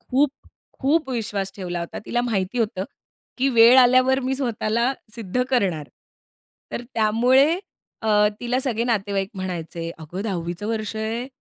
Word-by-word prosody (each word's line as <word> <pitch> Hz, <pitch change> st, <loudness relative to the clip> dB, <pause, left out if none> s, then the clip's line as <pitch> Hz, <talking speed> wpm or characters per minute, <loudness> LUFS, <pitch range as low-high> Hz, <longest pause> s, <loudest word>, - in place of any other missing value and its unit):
खूप, 270 Hz, +2 st, +2 dB, 0.5 s
खूप 290 Hz, +1 st, +1 dB
विश्वास 210 Hz, -5 st, -2 dB
ठेवला 175 Hz, -3 st, -4 dB
होता. 170 Hz, -, -6 dB
तिला 240 Hz, -, 0 dB
माहिती 220 Hz, -2 st, -1 dB
होतं 210 Hz, -5 st, -1 dB, 0.5 s
की 265 Hz, +2 st, +3 dB
वेळ 240 Hz, 0 st, +7 dB
आल्यावर 255 Hz, +1 st, +5 dB
मी 260 Hz, 0 st, -1 dB
स्वतःला 235 Hz, -1 st, 0 dB, 0.2 s
सिद्ध 230 Hz, +1 st, -1 dB
करणार. 185 Hz, -, 0 dB, 0.8 s
तर -, -, -3 dB
त्यामुळे 250 Hz, +9 st, +4 dB, 0.4 s
अ, 220 Hz, -, -1 dB, 0.3 s
तिला 245 Hz, +1 st, 0 dB
सगळे 235 Hz, -4 st, 0 dB
नातेवाईक 200 Hz, -4 st, 0 dB
म्हणायचे, 170 Hz, -3 st, -5 dB
"अगं, 160 Hz, +4 st, -7 dB
10चं 175 Hz, -5 st, -2 dB
चं 205 Hz, +4 st, -7 dB
वर्ष 220 Hz, -1 st, -2 dB
आहे 225 Hz, +3 st, -2 dB
225 Hz, 140 wpm, -23 LUFS, 195-250 Hz, 0.8 s, वेळ